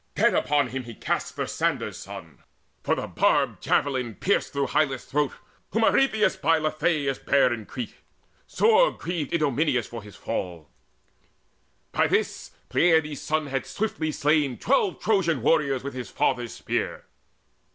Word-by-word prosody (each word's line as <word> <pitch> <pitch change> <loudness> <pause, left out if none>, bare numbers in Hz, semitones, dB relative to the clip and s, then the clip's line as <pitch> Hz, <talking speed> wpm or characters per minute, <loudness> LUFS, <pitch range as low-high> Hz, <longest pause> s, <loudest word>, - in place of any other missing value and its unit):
Dead - - +3
upon 145 -3 +2
him 130 0 -5
he 115 -2 -9
cast - - -2
Thersander's - - -1
son, - - -10 0.4
For - - +1
the - - -3
barbed - - +1
javelin 130 -5 0
pierced 200 - 0
through 140 -1 0
Hyllus' 135 -1 0
throat 145 0 0 0.4
Whom 225 - +2
Arethusa 220 -6 +3
by 165 0 +4
Lethaeus 155 -2 0
bare 135 -3 +3
In 110 -3 -7
Crete: 125 -4 -6 0.5
sore 460 +3 +4
grieved 165 -5 -4
Idomeneus 150 -5 +1
for 115 -1 -8
his 105 -1 -13
fall. 85 -5 -5 1.2
By - - +2
this - - -1 0.2
Peleides' 160 -4 +3
son 155 0 -1
had 135 -1 -3
swiftly 200 -7 -2
slain 150 -4 +1
Twelve 430 -6 +1
Trojan 170 - +1
warriors 140 -5 +2
with 140 - -5
his 125 -1 -6
father's 120 -3 -1
spear. - - -3
145 Hz, 140 wpm, -25 LUFS, 130-165 Hz, 1.2 s, by